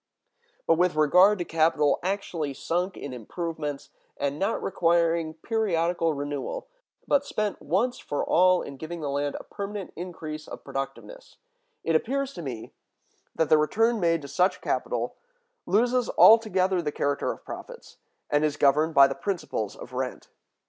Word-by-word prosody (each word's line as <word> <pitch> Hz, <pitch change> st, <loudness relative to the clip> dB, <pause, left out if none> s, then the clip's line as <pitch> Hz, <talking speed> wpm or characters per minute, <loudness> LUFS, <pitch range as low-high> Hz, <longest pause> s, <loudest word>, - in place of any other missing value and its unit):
But 165 Hz, 0 st, +3 dB
with 180 Hz, -2 st, +2 dB
regard 180 Hz, +7 st, +5 dB
to 175 Hz, -, -3 dB
capital 155 Hz, -3 st, +2 dB
actually 175 Hz, -6 st, -3 dB
sunk 180 Hz, +6 st, -2 dB
in 140 Hz, -, -6 dB
improvements, 150 Hz, -, -5 dB, 0.3 s
and 140 Hz, +1 st, -2 dB
not 200 Hz, +4 st, -1 dB
requiring 170 Hz, -3 st, +1 dB
periodical 170 Hz, -5 st, 0 dB
renewal, 145 Hz, -, -4 dB, 0.4 s
but 285 Hz, -1 st, +3 dB
spent 215 Hz, -6 st, -3 dB
once 210 Hz, -, 0 dB
for 145 Hz, -, -3 dB
all 185 Hz, +1 st, +4 dB
in 140 Hz, -, -8 dB
giving 165 Hz, +3 st, -6 dB
the 145 Hz, -2 st, -2 dB
land 145 Hz, 0 st, -1 dB
a -, -, -10 dB
permanent 200 Hz, -2 st, -6 dB
increase 160 Hz, -3 st, -7 dB
of -, -, -9 dB
productiveness, -, -, -7 dB, 0.5 s
it 165 Hz, -, +1 dB
appears 275 Hz, -, 0 dB
to -, -, -7 dB
me 125 Hz, -7 st, -7 dB, 0.6 s
that 160 Hz, -, +1 dB
the 155 Hz, -, +6 dB
return 225 Hz, +10 st, +2 dB
made 165 Hz, -4 st, +1 dB
to -, -, -7 dB
such 180 Hz, +7 st, +1 dB
capital -, -, -2 dB, 0.5 s
loses 245 Hz, +3 st, +2 dB
altogether 190 Hz, -5 st, +5 dB
the 150 Hz, -3 st, -2 dB
character 145 Hz, -1 st, -1 dB
of -, -, -11 dB
profits, -, -, -10 dB, 0.3 s
and 145 Hz, +1 st, +3 dB
is 150 Hz, -1 st, 0 dB
governed 155 Hz, +3 st, +3 dB
by 140 Hz, -1 st, +9 dB
the 135 Hz, -, 0 dB
principles 165 Hz, -, -3 dB
of -, -, -11 dB
rent. -, -, -4 dB
165 Hz, 155 wpm, -26 LUFS, 150-195 Hz, 0.6 s, by